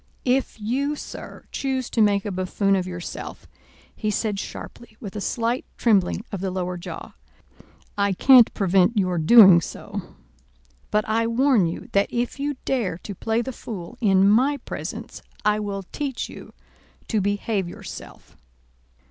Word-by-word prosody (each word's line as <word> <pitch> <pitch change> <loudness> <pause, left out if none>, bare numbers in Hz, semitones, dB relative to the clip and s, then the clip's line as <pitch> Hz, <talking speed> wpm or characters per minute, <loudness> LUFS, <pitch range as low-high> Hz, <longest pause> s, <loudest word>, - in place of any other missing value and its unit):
"If 255 -2 0
you, 270 +7 -1
sir, - - -9
choose 265 -2 -2
to 230 - +2
make 205 -1 +3
a 205 - -2
buffoon 190 +2 +1
of 185 -1 -1
yourself," 180 -1 -7 0.5
he 215 - -2
said 210 -1 -1
sharply, 220 +2 -9
with 200 -3 -8
a 210 - -3
slight 235 +4 -1
trembling 205 -2 +2
of 200 -4 -4
the 195 - -1
lower 180 -1 -3
jaw, 175 - -8 0.9
"I 200 -1 +2
can't 250 +4 +7
prevent 195 +3 +3
your 185 -3 +1
doing 190 0 +8
so; - - -7 0.7
but 210 0 +1
I 225 +1 +1
warn 235 -5 +3
you 165 - -6
that 200 0 +2
if 240 +3 -2
you 290 +1 -1
dare 225 -11 0
to 200 - -8
play 225 +4 -1
the 265 - -5
fool 210 -2 -8
in 195 -3 +4
my 260 +8 +4
presence, - - -6 0.2
I 210 0 +3
will 200 -2 -4
teach 280 -4 -3
you - - -11 0.6
to 215 -3 +1
behave 200 -1 -1
yourself." - - -10
210 Hz, 155 wpm, -24 LUFS, 190-240 Hz, 0.9 s, doing